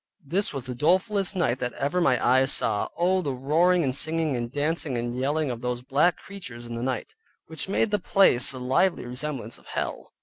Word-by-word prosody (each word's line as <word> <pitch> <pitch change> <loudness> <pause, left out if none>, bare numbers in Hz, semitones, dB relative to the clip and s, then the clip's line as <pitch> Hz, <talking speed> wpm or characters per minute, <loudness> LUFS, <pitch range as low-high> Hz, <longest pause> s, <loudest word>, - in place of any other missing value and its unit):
This 190 +8 0
was 135 -4 -6
the 130 - -5
dolefulest 190 - +1
night 130 -9 0
that 125 -1 -2
ever 170 +6 -1
my 130 -7 +3
eyes 130 +2 +4
saw. 105 - +1
Oh 185 +2 +2
the 145 -6 -2
roaring, 165 +7 +2
and 130 -2 0
singing 155 -1 0
and 120 -1 -3
dancing, 145 -2 -1
and 120 +1 -3
yelling 145 +2 0
of 120 -1 -6
those 125 0 -3
black 145 +7 +2
creatures 130 -12 -10
in 120 - -7
the 115 - -4
night, 130 - -3 0.3
which 160 +3 -3
made 210 +2 +1
the 210 - +2
place 190 - +4
a 130 - -7
lively 130 +9 +1
resemblance 125 -2 -5
of - - -22
hell. - - -4
140 Hz, 205 wpm, -26 LUFS, 125-175 Hz, 0.3 s, eyes